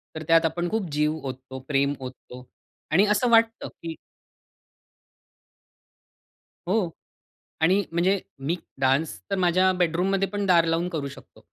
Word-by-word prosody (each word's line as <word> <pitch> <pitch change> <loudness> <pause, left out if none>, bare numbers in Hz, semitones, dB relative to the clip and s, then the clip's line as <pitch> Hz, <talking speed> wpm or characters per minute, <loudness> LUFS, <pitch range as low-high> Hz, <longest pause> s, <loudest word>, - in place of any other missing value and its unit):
तर 160 - -5
त्यात 165 0 +5
आपण 175 +2 -1
खूप 210 -4 -2
जीव 150 +1 +1
ओततो, 130 0 -7
प्रेम 140 -1 +2
ओततो 125 -1 -10 0.5
आणि 185 +6 +5
असं 240 +4 +2
वाटतं 230 0 +3
कि 165 -1 -5 2.7
हो. 190 -1 +1 0.7
आणि 185 +5 +4
म्हणजे 180 +4 +2 0.2
मी, 145 +6 -1 0.3
डान्स 135 +4 +1
तर - - +2
माझ्या 185 +2 +4
बेडरूममध्ये 185 +3 +1
पण 205 0 -2
दार 175 -3 +5
लावून 165 +1 0
करू 155 -5 -3
शकतो. - - -15
170 Hz, 130 wpm, -25 LUFS, 150-190 Hz, 2.7 s, त्यात